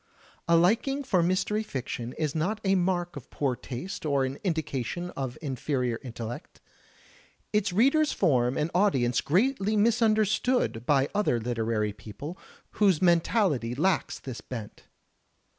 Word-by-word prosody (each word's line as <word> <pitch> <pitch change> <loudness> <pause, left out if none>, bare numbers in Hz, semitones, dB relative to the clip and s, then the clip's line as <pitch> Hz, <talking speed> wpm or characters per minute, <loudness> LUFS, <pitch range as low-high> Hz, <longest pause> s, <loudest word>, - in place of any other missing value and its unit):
A 170 - +5
liking 235 +11 +2
for 190 -9 +2
mystery 185 +5 +1
fiction 125 - -5
is 155 -3 -2
not 185 +8 -1
a 195 -1 +2
mark 175 -1 0
of 145 - -9
poor 135 -4 -1
taste 130 +10 -6
or 140 -3 +1
an 135 +2 -5
indication 160 - -2
of 130 -3 -5
inferior 130 -3 -1
intellect. 120 +3 -7 0.9
Its 210 -2 +2
readers 275 - +3
form 125 -3 +2
an 155 +2 -1
audience 135 - +2
greatly 210 - +1
misunderstood 215 - +2
by 140 -2 +3
other 205 - +1
literary 110 -2 -1
people 125 - -8 0.5
whose 190 -6 +5
mentality 170 - +2
lacks 180 +5 +1
this 130 -3 -8
bent. 115 -5 -8
160 Hz, 130 wpm, -28 LUFS, 125-200 Hz, 0.9 s, A